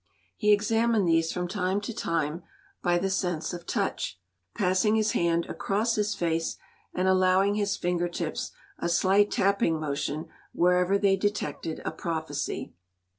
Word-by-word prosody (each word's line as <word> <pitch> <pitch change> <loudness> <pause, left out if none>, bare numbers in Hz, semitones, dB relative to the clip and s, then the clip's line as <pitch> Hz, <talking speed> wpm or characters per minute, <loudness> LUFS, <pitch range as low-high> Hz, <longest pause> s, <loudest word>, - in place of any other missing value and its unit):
He 210 -2 +2
examined 220 0 +3
these 165 -1 +3
from 180 -1 -2
time 190 +1 0
to 215 +3 -5
time 165 -3 -1 0.4
by 175 -1 +2
the 185 +2 0
sense 180 -4 -1
of 175 0 -8
touch, 95 - -2 0.4
passing 190 +3 +2
his 220 0 +2
hand 170 0 +1
across 215 +4 -1
his 210 -1 0
face 165 -1 -1 0.3
and 185 +1 0
allowing 190 +1 +4
his 205 -1 0
finger 175 0 0
tips 170 -2 -4 0.3
a 170 - -1
slight 195 +4 +4
tapping 195 -5 +2
motion 150 +1 -3 0.3
wherever 180 +2 +3
they 195 -1 +3
detected 185 -6 -2
a - - -1
prophecy. 160 -2 -4
185 Hz, 145 wpm, -27 LUFS, 170-205 Hz, 0.4 s, allowing